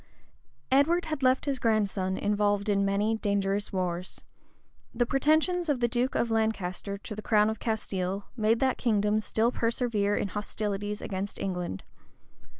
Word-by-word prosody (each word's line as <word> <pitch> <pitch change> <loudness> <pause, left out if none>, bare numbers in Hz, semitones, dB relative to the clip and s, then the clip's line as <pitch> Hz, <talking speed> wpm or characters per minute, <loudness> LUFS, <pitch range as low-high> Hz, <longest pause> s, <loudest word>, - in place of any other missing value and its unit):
Edward 325 +6 +4
had 310 -3 -3
left 255 0 +3
his 275 -3 -1
grandson 200 -5 +1
involved 205 0 +1
in 200 -1 +2
many 205 +3 +1
dangerous 200 -1 0
wars. 180 -1 -3 0.7
The 240 +1 +2
pretensions 315 +6 +2
of 280 -4 +1
the 240 - +2
duke 245 +2 0
of 235 - +1
Lancaster 200 -3 -1
to 210 +2 -8
the 215 - -6
crown 215 0 +3
of 220 - -6
Castile, 200 -3 -2
made 225 0 +2
that 260 -1 +1
kingdom 210 -2 +2
still 220 +2 +1
persevere 230 -4 0
in 200 - -1
hostilities 210 0 -3
against 195 +1 -4
England. 180 - -3
215 Hz, 150 wpm, -28 LUFS, 200-240 Hz, 0.7 s, Edward